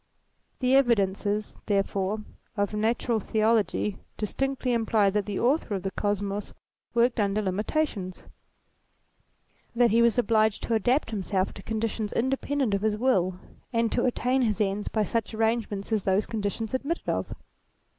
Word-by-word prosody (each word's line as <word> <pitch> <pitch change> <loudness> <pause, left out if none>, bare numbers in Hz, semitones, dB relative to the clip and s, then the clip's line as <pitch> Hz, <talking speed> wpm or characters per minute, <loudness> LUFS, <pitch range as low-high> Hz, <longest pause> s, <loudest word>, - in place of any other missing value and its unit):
The 255 +1 +4
evidences, 210 -4 +1
therefore, 200 +1 0 0.3
of 205 +1 0
Natural 225 +2 +1
Theology 215 -1 +1 0.2
distinctly 260 +4 -1
imply 220 -3 +2
that 210 0 -1
the 205 - -2
author 250 -3 +1
of 190 - -4
the 195 - -2
Kosmos 205 0 -2 0.4
worked 235 0 +3
under 205 0 +1
limitations; 205 - -2 1.5
that 235 -1 +4
he 230 +2 +4
was 235 -1 +4
obliged 220 -2 +2
to 235 - -1
adapt 245 +4 +2
himself 195 -2 -1
to - - -10
conditions 220 -1 -2
independent 265 -1 0
of 200 - +1
his 215 0 +1
will, 185 -7 +1 0.3
and 230 -2 +1
to 240 - +1
attain 255 +1 +1
his 215 -4 +1
ends 205 0 0
by 215 - +1
such 225 +2 -2
arrangements 220 -2 -1
as 215 -2 +2
those 195 +2 +1
conditions 220 0 -3
admitted 280 +6 -2
of. - - -2
215 Hz, 145 wpm, -27 LUFS, 200-235 Hz, 1.5 s, The